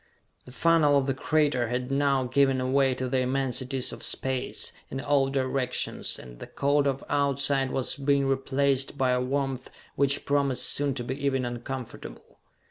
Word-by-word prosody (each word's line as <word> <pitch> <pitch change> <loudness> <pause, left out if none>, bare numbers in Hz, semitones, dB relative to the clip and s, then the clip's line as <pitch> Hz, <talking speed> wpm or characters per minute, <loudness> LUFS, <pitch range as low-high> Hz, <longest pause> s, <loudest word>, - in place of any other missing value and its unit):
The 125 - -12
funnel 155 0 +3
of 135 - +1
the 135 - 0
crater 145 -3 +1
had 125 +2 -3
now 140 -1 +2
given 135 +1 +2
away 130 0 +2
to 130 - -3
the 130 +1 0
immensities 130 0 -1
of - - -9
space, 130 -1 -2 0.2
in 135 - -4
all 140 -1 +2
directions, 130 -1 -1
and - - -12
the - - -8
cold 140 0 +1
of 135 0 -2
outside 140 -1 +1
was 130 -1 -2
being 140 0 +2
replaced 135 0 0
by 130 -2 +2
a 125 0 +1
warmth 135 0 -2 0.3
which 140 0 +1
promised 140 -2 +1
soon 140 -2 +2
to 125 - -4
be 135 +4 -5
even 135 -2 +1
uncomfortable. 120 +1 -7
135 Hz, 165 wpm, -27 LUFS, 130-140 Hz, 0.3 s, funnel